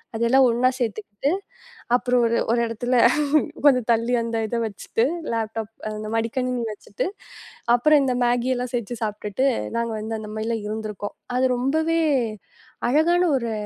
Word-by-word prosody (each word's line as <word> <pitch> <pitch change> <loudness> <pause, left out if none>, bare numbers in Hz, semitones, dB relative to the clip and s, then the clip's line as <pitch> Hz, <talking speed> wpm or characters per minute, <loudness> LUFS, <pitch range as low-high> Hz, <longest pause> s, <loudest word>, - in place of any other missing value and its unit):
அதெல்லாம் 235 +4 +4
ஒண்ணா 245 +2 +3
சேர்த்துக்கிட்டு 215 +2 -2 0.6
அப்புறம் 245 0 +2
ஒரு 230 0 +2
ஒரு 235 - +2
இடத்துல 245 +2 -1 0.7
கொஞ்சம் 255 -5 +5
தள்ளி 230 +2 +1
அந்த 230 0 -2
இதை 235 - -2
வச்சிட்டு 220 +1 -2 0.3
லேப்டாப் 225 -1 -3 0.2
அந்த 215 0 -5
மடிக்கணினி 245 +2 -1
வச்சிட்டு 205 -1 -5 0.7
அப்புறம் 295 +4 +4
இந்த 260 -2 +1
Maggi 245 +1 +1
எல்லாம் 245 0 -3
செஞ்சு 240 0 -3
சாப்பிட்டுட்டு, 210 +4 -1 0.3
நாங்க 235 -1 -1 0.3
அந்த 215 -1 -8
மாதிரி 215 +1 -3
எல்லாம் 225 -2 -2
இருந்திருக்கோம். 210 -1 -5 0.2
அது 260 +1 +3
ரொம்பவே 315 +6 +1 0.9
அழகான 330 +6 +3 0.2
ஒரு 235 -2 -3
235 Hz, 135 wpm, -23 LUFS, 220-255 Hz, 0.9 s, கொஞ்சம்